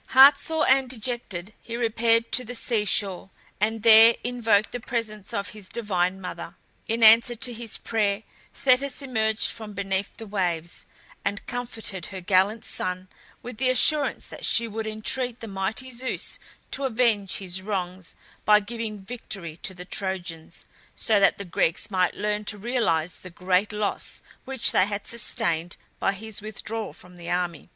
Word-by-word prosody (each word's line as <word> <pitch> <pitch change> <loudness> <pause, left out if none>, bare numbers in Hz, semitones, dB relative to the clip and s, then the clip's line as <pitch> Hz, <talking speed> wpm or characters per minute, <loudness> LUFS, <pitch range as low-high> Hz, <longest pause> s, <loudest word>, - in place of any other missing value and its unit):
Heart 270 +2 +8
sore 320 -1 0
and 265 -1 +4
dejected 220 -6 -5
he 230 0 -6
repaired 230 0 +2
to 255 - +3
the 245 +1 -6
sea 230 -2 0
shore, 195 -1 0 0.3
and 220 +1 0
there 225 +1 +9
invoked 230 -4 +1
the 245 - -4
presence 215 -4 -4
of 200 0 -3
his 210 -3 -10
divine 190 -5 -1
mother. 185 - -7 0.3
In 230 +1 0
answer 230 +2 +7
to 245 +2 +1
his 230 -1 -5
prayer 210 -2 -1 0.3
Thetis 275 +2 +1
emerged 220 -4 0
from 220 -2 -8
beneath 195 0 -3
the 225 - -8
waves, 175 -5 -3 0.4
and 200 +1 -3
comforted 225 -7 -5
her 195 -2 -7
gallant 195 +5 +2
son 185 0 -3 0.3
with 245 -2 -8
the 255 +2 +1
assurance 290 +3 +5
that - - -10
she 230 0 +4
would 220 0 -4
entreat 235 +3 -1
the 225 - -7
mighty 200 +6 -3
Zeus 255 +2 -4 0.3
to 275 - -2
avenge 220 -6 +1
his 190 -1 -5
wrongs 185 -3 -4 0.3
by 210 0 +6
giving 215 -1 -6
victory 195 -8 -7
to 190 - -3
the 180 0 -9
Trojans, 180 -4 -4 0.3
so 215 -2 +2
that 195 - +4
the 200 - -7
Greeks 175 +3 +1
might 185 -2 +1
learn 210 0 -1
to 210 - -2
realize 200 -7 0
the 185 - -11
great 180 +3 0
loss 210 -1 -3 0.2
which 265 -2 +3
they 185 - +3
had 205 -1 -4
sustained 170 -7 -1 0.2
by 195 - +1
his 215 +1 -4
withdrawal 215 +1 -5
from 180 0 -16
the 170 -1 -8
army. 175 -3 -2
215 Hz, 165 wpm, -25 LUFS, 190-235 Hz, 0.4 s, there